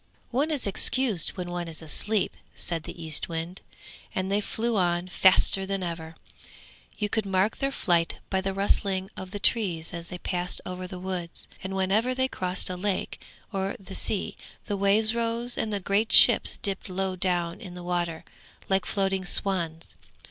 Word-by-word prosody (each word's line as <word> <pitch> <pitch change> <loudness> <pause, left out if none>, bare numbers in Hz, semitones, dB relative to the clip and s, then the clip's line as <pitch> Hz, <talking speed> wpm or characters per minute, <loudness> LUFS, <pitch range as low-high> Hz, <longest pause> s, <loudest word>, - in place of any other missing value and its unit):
'One 275 +6 +1
is 295 -5 0
excused 210 - +1
when 175 -1 -4
one 175 -1 -3
is 165 -1 -3
asleep!' 200 +6 0 0.2
said 165 -2 -2
the 170 - -8
Eastwind, 165 +3 -2 0.5
and 190 +1 -1
they 205 +1 +2
flew 230 +2 -1
on 175 -2 +1
faster 190 +1 +5
than 195 -1 -3
ever. 165 -2 -5 0.8
You 210 - 0
could 210 0 -1
mark 195 +3 +1
their 275 - 0
flight 170 -9 +1
by 190 -1 +1
the 195 +1 -2
rustling 195 -1 0
of 185 - -7
the 205 - -5
trees 195 -6 +4
as 170 -1 -6
they 180 - -7
passed 180 0 -1
over 185 0 -5
the 185 - -8
woods; 180 -2 -5 0.2
and 190 0 -4
whenever 210 +7 +1
they 260 0 +2
crossed 185 -6 -2
a - - -3
lake, 195 +1 -3 0.3
or 195 0 -2
the 195 - -11
sea, 205 - -1 0.3
the 205 - -2
waves 205 +3 +3
rose 235 +1 +2
and 215 - -2
the 205 - -1
great 200 +4 0
ships - - +7
dipped 195 -1 -2
low 190 0 -2
down 175 -1 0
in 185 -5 -9
the 180 - -8
water, 175 -2 -2 0.4
like 190 -1 +1
floating 195 -2 0
swans. 175 -3 -1
190 Hz, 175 wpm, -26 LUFS, 175-205 Hz, 0.8 s, ships